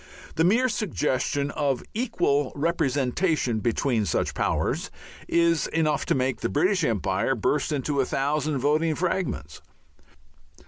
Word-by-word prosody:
The 160 Hz, -, +1 dB
mere 225 Hz, +9 st, +4 dB
suggestion 145 Hz, -, -1 dB
of 140 Hz, -5 st, -1 dB
equal 145 Hz, -, 0 dB
representation 140 Hz, -3 st, 0 dB
between 115 Hz, -1 st, 0 dB
such -, -, 0 dB
"powers" -, -, -1 dB, 0.4 s
is 170 Hz, -1 st, +2 dB
enough 155 Hz, -3 st, 0 dB
to -, -, +2 dB
make 130 Hz, 0 st, -1 dB
the -, -, -1 dB
British 180 Hz, +4 st, +1 dB
Empire 105 Hz, +1 st, 0 dB
burst 145 Hz, +7 st, 0 dB
into 140 Hz, -1 st, 0 dB
a -, -, 0 dB
thousand 145 Hz, +1 st, 0 dB
(voting) 155 Hz, +4 st, +1 dB
fragments. 175 Hz, -, -2 dB
145 Hz, 125 wpm, -25 LUFS, 130-165 Hz, 0.4 s, mere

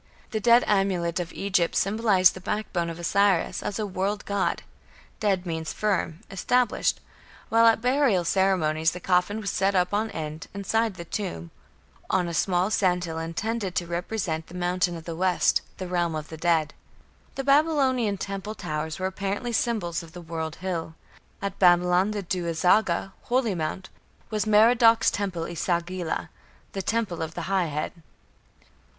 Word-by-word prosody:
The 220 Hz, -, -1 dB
"ded" 235 Hz, +3 st, +5 dB
amulet 185 Hz, -4 st, +1 dB
of 175 Hz, 0 st, -4 dB
Egypt 185 Hz, -4 st, 0 dB
symbolized 200 Hz, -2 st, +3 dB
the 185 Hz, -, -10 dB
backbone 180 Hz, -4 st, -2 dB
of 165 Hz, -, -6 dB
Osiris 190 Hz, +1 st, +2 dB
as 200 Hz, -, -3 dB
a 215 Hz, -, -1 dB
world 200 Hz, +1 st, -2 dB
god: 200 Hz, -1 st, -1 dB, 0.6 s
"ded" 195 Hz, -4 st, +1 dB
means 160 Hz, -2 st, -3 dB
"firm", 190 Hz, -6 st, -1 dB
"established"; 245 Hz, +5 st, +1 dB, 0.5 s
while 230 Hz, 0 st, +5 dB
at 225 Hz, 0 st, +4 dB
burial 250 Hz, -8 st, +2 dB
ceremonies 165 Hz, -4 st, +2 dB
the 180 Hz, -, -6 dB
coffin 180 Hz, +4 st, +1 dB
was 200 Hz, -2 st, -2 dB
set 195 Hz, +1 st, +1 dB
up 180 Hz, +1 st, +2 dB
on 215 Hz, +2 st, +1 dB
end, 155 Hz, -2 st, -6 dB
inside 220 Hz, +1 st, 0 dB
the 170 Hz, -, -8 dB
tomb, 85 Hz, -, -5 dB, 0.6 s
"on 180 Hz, -2 st, +1 dB
a 170 Hz, -, -4 dB
small 180 Hz, +3 st, +1 dB
sandhill 180 Hz, -5 st, +1 dB
intended 190 Hz, +4 st, -3 dB
to 175 Hz, -, 0 dB
represent 170 Hz, -2 st, -3 dB
the 180 Hz, -, -12 dB
Mountain 180 Hz, 0 st, 0 dB
of 165 Hz, -, -10 dB
the 165 Hz, -, -5 dB
West 180 Hz, +1 st, +2 dB, 0.2 s
the 185 Hz, -, -5 dB
realm 175 Hz, -2 st, 0 dB
of 155 Hz, 0 st, -5 dB
the 160 Hz, -, -7 dB
dead". 160 Hz, -2 st, +1 dB, 0.6 s
The 270 Hz, -, -3 dB
Babylonian 275 Hz, -7 st, +3 dB
temple 200 Hz, +2 st, -5 dB
towers 155 Hz, -2 st, -4 dB
were 185 Hz, -, -3 dB
apparently 200 Hz, +5 st, -2 dB
symbols 215 Hz, -8 st, 0 dB
of 165 Hz, -1 st, -13 dB
the 180 Hz, -, -8 dB
"world 160 Hz, -1 st, -4 dB
hill". 170 Hz, -3 st, -4 dB, 0.5 s
At 200 Hz, -1 st, -4 dB
Babylon, 180 Hz, +1 st, +4 dB
the 210 Hz, -1 st, -3 dB
Du 180 Hz, 0 st, -2 dB
azaga, 180 Hz, +2 st, +2 dB
"holy 245 Hz, -4 st, +1 dB
mound", 175 Hz, +2 st, -4 dB, 0.4 s
was 215 Hz, -1 st, -1 dB
Merodach's 225 Hz, +2 st, +5 dB
temple 185 Hz, -5 st, -3 dB
E -, -, -6 dB
sagila, 170 Hz, 0 st, -2 dB, 0.4 s
"the 195 Hz, -, -3 dB
Temple 210 Hz, -3 st, -1 dB
of 160 Hz, 0 st, -4 dB
the -, -, -4 dB
High 190 Hz, -2 st, +1 dB
Head". 150 Hz, 0 st, -3 dB
185 Hz, 160 wpm, -26 LUFS, 170-210 Hz, 0.6 s, ded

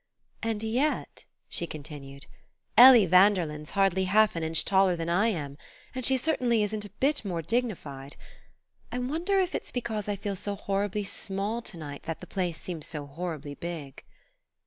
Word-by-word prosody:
"And 225 Hz, -2 st, -2 dB
yet," 250 Hz, +7 st, -1 dB, 0.2 s
she 170 Hz, -, -2 dB
continued, 140 Hz, -3 st, -9 dB, 0.5 s
"Ellie 245 Hz, -2 st, +9 dB
Vanderlyn's 180 Hz, -5 st, +3 dB
hardly 190 Hz, -1 st, +3 dB
half 210 Hz, +2 st, +3 dB
an 165 Hz, -, -2 dB
inch 160 Hz, 0 st, +2 dB
taller 190 Hz, -2 st, +3 dB
than 165 Hz, 0 st, -4 dB
I 190 Hz, +6 st, +3 dB
am; 145 Hz, -9 st, -3 dB, 0.3 s
and 255 Hz, -1 st, -4 dB
she 265 Hz, +2 st, +4 dB
certainly 250 Hz, -6 st, +1 dB
isn't 210 Hz, 0 st, -3 dB
a -, -, -9 dB
bit 285 Hz, 0 st, +2 dB
more 175 Hz, -5 st, -3 dB
dignified.... 155 Hz, -, -3 dB, 0.8 s
I -, -, -3 dB
wonder 330 Hz, +10 st, 0 dB
if 370 Hz, -1 st, 0 dB
it's -, -, -4 dB
because 220 Hz, -4 st, -3 dB
I 205 Hz, -, 0 dB
feel 200 Hz, 0 st, -4 dB
so 200 Hz, +2 st, -3 dB
horribly 200 Hz, +1 st, -2 dB
small 200 Hz, +3 st, -2 dB
to 215 Hz, -6 st, -3 dB
night 145 Hz, -3 st, -7 dB
that 165 Hz, -, -4 dB
the -, -, -9 dB
place 180 Hz, -4 st, -2 dB
seems 165 Hz, -4 st, -5 dB
so 150 Hz, -2 st, -5 dB
horribly 150 Hz, -1 st, -6 dB
big." 155 Hz, -4 st, -7 dB
195 Hz, 170 wpm, -28 LUFS, 165-225 Hz, 0.8 s, Ellie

